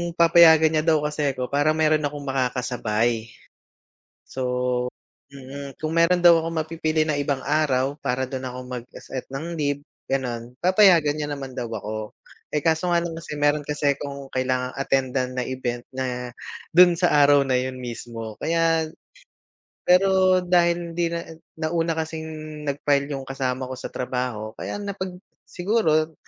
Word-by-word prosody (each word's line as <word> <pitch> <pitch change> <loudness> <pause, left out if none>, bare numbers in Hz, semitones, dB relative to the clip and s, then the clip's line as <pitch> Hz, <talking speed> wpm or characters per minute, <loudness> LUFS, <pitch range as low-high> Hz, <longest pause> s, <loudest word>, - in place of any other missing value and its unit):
papayagan 165 -2 +7
niya 155 -1 +1
daw 155 -2 +3
kasi 150 -2 -1
ako 125 +1 -4
parang 145 +2 +2
meron 155 -1 +3
akong 145 0 -7
makakasabay. 120 -3 -1 1.0
So 130 - -5 0.9
mm, 140 0 -9
kung 155 +1 -2
meron 170 +2 +4
daw 170 -2 +7
akong 165 0 -3
mapipili 155 -1 0
ng 150 -2 0
ibang 140 -2 -1
araw 140 -2 +1
para 130 -1 -1
dun 130 0 -5
ako 125 0 -6
mag 125 -2 -6
se-set 130 - -7
ng 160 +5 -5
leave, 145 -2 -1 0.3
gano'n, 125 -2 -2
papayagan 180 -5 +5
niya 150 - -2
naman 135 -2 -5
daw 120 - -3
ako, 110 0 -5 0.4
eh, 150 - +1
kaso 165 +2 +1
nga 170 - +3
lang 170 - -3
kasi, 155 - -7
meron 145 0 +1
kasi 145 -1 +1
akong 140 -1 -7
kailangang 130 0 -1
attendan 130 -2 0
na 125 - -1
event 120 -2 -3
na 125 -2 -4 0.4
dun 175 +1 +7
sa 175 0 +2 0.2
araw 145 -1 +5
na 130 -2 +1
yun 130 0 -2
mismo. 115 -2 -7
Kaya, 165 -1 +1 1.0
pero 185 0 +4
dahil 175 -1 +2
hindi 170 0 0
na, 170 0 -3 0.3
nauna 165 0 -1
kasing 160 0 -4 0.4
nag-file 140 0 +1
yung 135 - -5
kasama 130 -1 -3
ko 130 - -6
sa - - -7
trabaho 125 -4 -3
kaya 205 - -5
napag 195 -3 -5 0.3
siguro 165 -5 +1
145 Hz, 155 wpm, -24 LUFS, 130-165 Hz, 1.0 s, papayagan